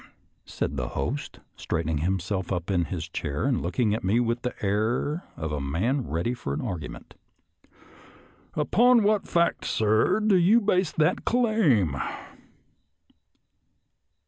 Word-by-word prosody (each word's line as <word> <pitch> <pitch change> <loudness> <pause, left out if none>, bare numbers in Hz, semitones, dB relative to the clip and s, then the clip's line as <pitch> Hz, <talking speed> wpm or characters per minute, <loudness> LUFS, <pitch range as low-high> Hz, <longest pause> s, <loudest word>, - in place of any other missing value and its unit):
" - - -44
said 70 - -3
the 65 -2 -2
host, 125 - -3
straightening 80 -1 -2
himself 95 +2 -2
up 90 +1 -2
in 90 -3 +1
his - - -5
chair 70 0 -3
and - - +1
looking 105 +5 0
at 110 - -3
me 100 +6 +2
with 120 0 0
the 125 - -3
air 115 - 0
of 80 -1 -4
a 75 -2 -2
man 105 - -1
ready 85 +10 -1
for 70 - -4
an - - -3
argument. 90 -11 -6 0.7
" - - -25
Upon 240 +1 +4
what 210 0 +2
fact, 170 0 +1
sir, 110 - +2
do 210 -3 +3
you 190 +7 +5
base 190 -5 +1
that 155 +3 +1
claim.? 190 - +2
110 Hz, 145 wpm, -26 LUFS, -, 0.7 s, you